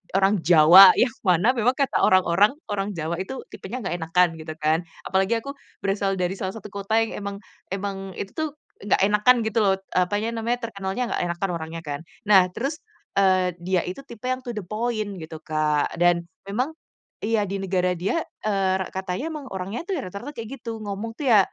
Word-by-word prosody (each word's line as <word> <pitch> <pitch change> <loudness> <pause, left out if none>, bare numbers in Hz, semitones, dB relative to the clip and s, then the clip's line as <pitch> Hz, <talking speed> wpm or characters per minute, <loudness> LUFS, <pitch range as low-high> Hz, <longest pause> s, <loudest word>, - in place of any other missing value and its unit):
orang 195 +2 +4
Jawa, 175 +3 +9
yang 250 - +4 0.2
mana 180 +4 +4
memang 240 +1 +2
kata 275 -2 +1
orang-orang, 185 +5 +4 0.2
orang 200 0 -2
Jawa 165 0 -3
itu 225 +8 -5
tipenya 245 +7 -6
nggak 185 - -2
enakan, 170 +2 +3
gitu 155 0 -7
kan. 160 +3 +1 0.2
Apalagi 190 +4 +1
aku 275 - -6 0.3
berasal 195 0 0
dari 180 0 -1
salah 190 +1 -3
satu 210 -2 -8
kota 200 +2 -1
yang 225 - -2
emang 200 -1 -5 0.4
emang 195 -1 -4
itu 200 - -5
tuh 315 -1 -1 0.4
nggak 205 - +2
enakan 210 +5 +5
gitu 220 +1 0
loh, 195 -1 +4
eee, 185 -1 0
apanya 210 +4 -1
namanya, 235 +1 -1
terkenal 195 -3 -4
nggak 250 0 -1
enakan 175 +3 -2
orangnya 165 +1 -6
kan. 145 -3 -5 0.3
Nah 190 -3 +7
terus, 280 - -3 0.4
eee, 185 -2 +3
dia 180 +1 0
itu 185 +10 -7
tipe 235 +2 -6
yang 255 0 0
to 240 - -4
the 210 - -3
point, 215 0 -2
gitu 160 -1 -8
Kak. 155 -2 0
Dan, 170 0 +3 0.2
memang 250 +9 -1 0.5
iya 220 -1 +2
di 195 - -2
negara 185 -1 0
dia, 195 - 0 0.2
eee, 195 -3 +1
re - - -2
katanya 190 - -3
emang 300 -3 -6
orangnya 190 +4 -4
tuh 385 - 0
rata-rata 200 +4 -6
kayak 235 +4 -7
gitu. 230 -2 -5
Ngomong 210 +3 -5
tuh 285 - -3
ya, 210 - +8
195 Hz, 190 wpm, -24 LUFS, 180-225 Hz, 0.5 s, Jawa